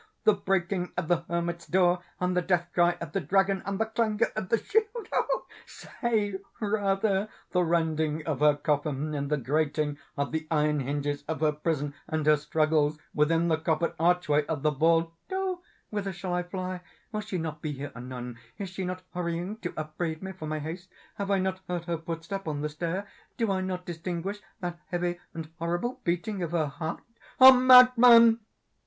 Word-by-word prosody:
—the 215 Hz, -, +6 dB
breaking 190 Hz, -2 st, -1 dB
of 180 Hz, -3 st, -1 dB
the 175 Hz, -1 st, +2 dB
hermit's 170 Hz, 0 st, -2 dB
door, 180 Hz, -1 st, +3 dB, 0.2 s
and 180 Hz, 0 st, 0 dB
the 180 Hz, -, +3 dB
death 175 Hz, -1 st, 0 dB
cry 175 Hz, 0 st, +3 dB
of 170 Hz, -2 st, -6 dB
the 195 Hz, -, 0 dB
dragon, 195 Hz, +5 st, +2 dB
and 200 Hz, 0 st, -1 dB
the 225 Hz, -, +2 dB
clangor 220 Hz, -1 st, 0 dB
of 200 Hz, -4 st, -3 dB
the 230 Hz, -, +4 dB
shield!—say, 300 Hz, -, -2 dB, 0.2 s
rather, 200 Hz, -1 st, +1 dB, 0.2 s
the 180 Hz, -, +2 dB
rending 160 Hz, -2 st, 0 dB
of 155 Hz, -5 st, -2 dB
her 150 Hz, 0 st, +5 dB
coffin, 145 Hz, 0 st, -1 dB
and 140 Hz, -1 st, -2 dB
the 150 Hz, -, +1 dB
grating 145 Hz, +2 st, 0 dB, 0.2 s
of 140 Hz, 0 st, -1 dB
the 160 Hz, 0 st, -3 dB
iron 150 Hz, -1 st, +2 dB
hinges 145 Hz, +2 st, -2 dB
of 160 Hz, 0 st, -3 dB
her 155 Hz, -1 st, +4 dB
prison, 150 Hz, -1 st, -2 dB
and 155 Hz, -1 st, -1 dB
her 155 Hz, 0 st, +6 dB
struggles 155 Hz, 0 st, +1 dB, 0.2 s
within 165 Hz, +3 st, +2 dB
the 160 Hz, -2 st, +2 dB
coppered 160 Hz, +1 st, 0 dB
archway 165 Hz, -3 st, +3 dB
of 150 Hz, -3 st, -3 dB
the 155 Hz, -, +3 dB
vault! 165 Hz, +3 st, +2 dB, 0.2 s
Oh 375 Hz, -1 st, -2 dB, 0.3 s
whither 200 Hz, -2 st, -2 dB
shall 180 Hz, 0 st, -4 dB
I 180 Hz, -, +1 dB
fly? 185 Hz, 0 st, -5 dB, 0.3 s
Will 215 Hz, -1 st, -2 dB
she 190 Hz, -, -4 dB
not 160 Hz, -2 st, -4 dB
be 155 Hz, -, -3 dB
here 140 Hz, +1 st, -6 dB
anon? 125 Hz, -1 st, -7 dB, 0.2 s
Is 200 Hz, -2 st, -5 dB
she 190 Hz, +1 st, -5 dB
not 185 Hz, 0 st, -4 dB
hurrying 175 Hz, +3 st, -3 dB
to 175 Hz, -5 st, -5 dB
upbraid 160 Hz, +2 st, -4 dB
me 190 Hz, -, -4 dB
for 175 Hz, -4 st, -7 dB
my 155 Hz, 0 st, -2 dB
haste? 165 Hz, +5 st, -6 dB, 0.3 s
Have 200 Hz, -1 st, -3 dB
I 200 Hz, -, +3 dB
not 190 Hz, 0 st, -1 dB
heard 175 Hz, -1 st, -3 dB
her 170 Hz, -2 st, -2 dB
footstep 165 Hz, +3 st, -5 dB
on 145 Hz, -2 st, -2 dB
the 150 Hz, -, -1 dB
stair? 170 Hz, +6 st, -3 dB, 0.3 s
Do 225 Hz, -4 st, +1 dB
I 190 Hz, -1 st, 0 dB
not 185 Hz, -1 st, -3 dB
distinguish 175 Hz, +3 st, -4 dB, 0.2 s
that 175 Hz, -1 st, -4 dB
heavy 175 Hz, -1 st, -2 dB, 0.2 s
and 165 Hz, -2 st, -5 dB
horrible 175 Hz, +9 st, -2 dB
beating 185 Hz, +3 st, -1 dB
of 170 Hz, -1 st, -3 dB
her 160 Hz, -3 st, +2 dB
heart? 160 Hz, +3 st, -5 dB, 0.4 s
Madman!" 250 Hz, -3 st, +9 dB
175 Hz, 185 wpm, -28 LUFS, 155-195 Hz, 0.4 s, Madman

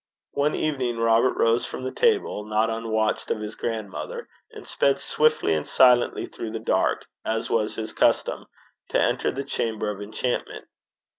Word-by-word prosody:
One 145 Hz, +1 st, +1 dB
evening 130 Hz, -6 st, -1 dB
Robert 115 Hz, +2 st, +3 dB
rose 115 Hz, +1 st, +2 dB
from -, -, -7 dB
the 130 Hz, -, -3 dB
table, 425 Hz, -, +1 dB
not 110 Hz, +1 st, +1 dB
unwatched 110 Hz, -1 st, -1 dB
of -, -, -1 dB
his 105 Hz, 0 st, -5 dB
grandmother, 110 Hz, -5 st, -5 dB, 0.2 s
and -, -, -11 dB
sped 140 Hz, 0 st, +2 dB
swiftly 155 Hz, -, +2 dB
and 75 Hz, -1 st, -1 dB
silently 125 Hz, -2 st, +4 dB
through 110 Hz, -1 st, -7 dB
the 115 Hz, -, -3 dB
dark, 110 Hz, -, +1 dB, 0.2 s
as 115 Hz, 0 st, -2 dB
was 110 Hz, -2 st, +1 dB
his 110 Hz, -1 st, -5 dB
custom, -, -, +1 dB, 0.4 s
to -, -, +2 dB
enter -, -, +1 dB
the 140 Hz, -, -4 dB
chamber 110 Hz, -6 st, -2 dB
of 100 Hz, 0 st, -8 dB
enchantment. 110 Hz, +4 st, -3 dB
115 Hz, 160 wpm, -25 LUFS, 110-130 Hz, 0.4 s, silently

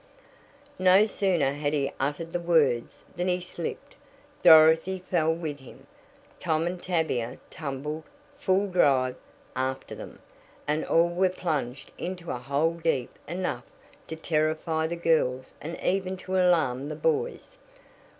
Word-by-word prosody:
No 185 Hz, +3 st, +6 dB
sooner 180 Hz, -10 st, +1 dB
had 145 Hz, +1 st, -2 dB
he 140 Hz, -2 st, 0 dB
uttered 150 Hz, +5 st, -2 dB
the 175 Hz, -, 0 dB
words 155 Hz, -9 st, +1 dB
than 175 Hz, +1 st, -1 dB
he 180 Hz, 0 st, +1 dB
slipped, 175 Hz, -2 st, -6 dB, 0.5 s
Dorothy 160 Hz, +4 st, +7 dB
fell 175 Hz, -3 st, +1 dB
with 160 Hz, -3 st, -4 dB
him, 130 Hz, -, -14 dB, 0.5 s
Tom 160 Hz, -2 st, 0 dB
and 175 Hz, +1 st, -3 dB
Tavia 160 Hz, -10 st, -1 dB
tumbled, 150 Hz, 0 st, -5 dB, 0.3 s
full 195 Hz, -6 st, +1 dB
drive, 135 Hz, -8 st, +3 dB, 0.4 s
after 130 Hz, +1 st, -2 dB
them, -, -, -9 dB, 0.5 s
and 150 Hz, +1 st, 0 dB
all 170 Hz, +1 st, +3 dB
were 185 Hz, +2 st, +2 dB
plunged 145 Hz, -8 st, -3 dB
into 180 Hz, -1 st, -5 dB
a 125 Hz, -, -3 dB
hole 140 Hz, +6 st, 0 dB
deep 135 Hz, -7 st, 0 dB, 0.2 s
enough 170 Hz, -8 st, -3 dB, 0.4 s
to 160 Hz, -, -5 dB
terrify 160 Hz, 0 st, 0 dB
the 170 Hz, -, -3 dB
girls 145 Hz, -7 st, +1 dB
and 165 Hz, +3 st, -6 dB
even 190 Hz, 0 st, 0 dB
to 185 Hz, 0 st, -5 dB
alarm 160 Hz, -7 st, +2 dB
the -, -, -4 dB
boys. 485 Hz, +1 st, -2 dB
160 Hz, 135 wpm, -27 LUFS, 145-180 Hz, 0.5 s, Dorothy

